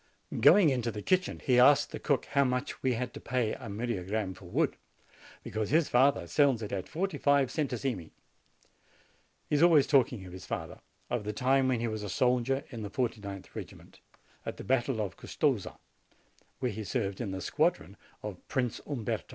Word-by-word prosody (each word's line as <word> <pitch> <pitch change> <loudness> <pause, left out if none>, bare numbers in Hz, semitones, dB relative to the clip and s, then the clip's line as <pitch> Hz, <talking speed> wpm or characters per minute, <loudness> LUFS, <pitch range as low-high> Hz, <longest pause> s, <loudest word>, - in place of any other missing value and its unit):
Going 155 - +7
into 120 -3 -1
the 105 -2 -6
kitchen, 185 -1 +1
he 125 -2 +4
asked 140 +3 +6
the - - -5
cook 140 -5 0
how 140 0 +2
much 125 -1 -2
we 130 -1 +1
had 125 +1 -3
to - - -8
pay 120 -3 0
a - - -8
myriagramme 100 -2 -2
for - - -14
wood, - - 0 0.7
because 110 -1 -3
his 160 +1 +3
father 130 -5 +3
sells 125 - +2
it 105 - -5
at 95 -2 -4
forty 190 +4 -2
five 140 -2 +3
centesimi. 130 - -2 1.4
He - - 0
is - - +1
always 165 -5 +6
talking 125 -7 +2
of 90 - -10
his 95 - -9
father, - - -5 0.3
of 120 -3 -1
the 105 +1 -3
time 130 +4 +2
when 125 -3 +1
he 120 - 0
was 110 -1 -3
a 105 - -5
soldier 125 +6 +1
in 115 -3 -6
the 105 - -5
49th 105 -5 -4
regiment, - - -10 0.4
at - - -5
the - - -7
battle 130 -2 +1
of 95 -4 -4
Custoza, 130 -10 -1 0.8
where 125 -2 -1
he 110 +1 -5
served 100 -1 -2
in 110 - -3
the 95 0 -4
squadron - - 0 0.3
of 105 -3 -5
Prince 125 -4 -1
Umberto. 125 -8 -3
125 Hz, 185 wpm, -30 LUFS, 105-135 Hz, 1.4 s, Going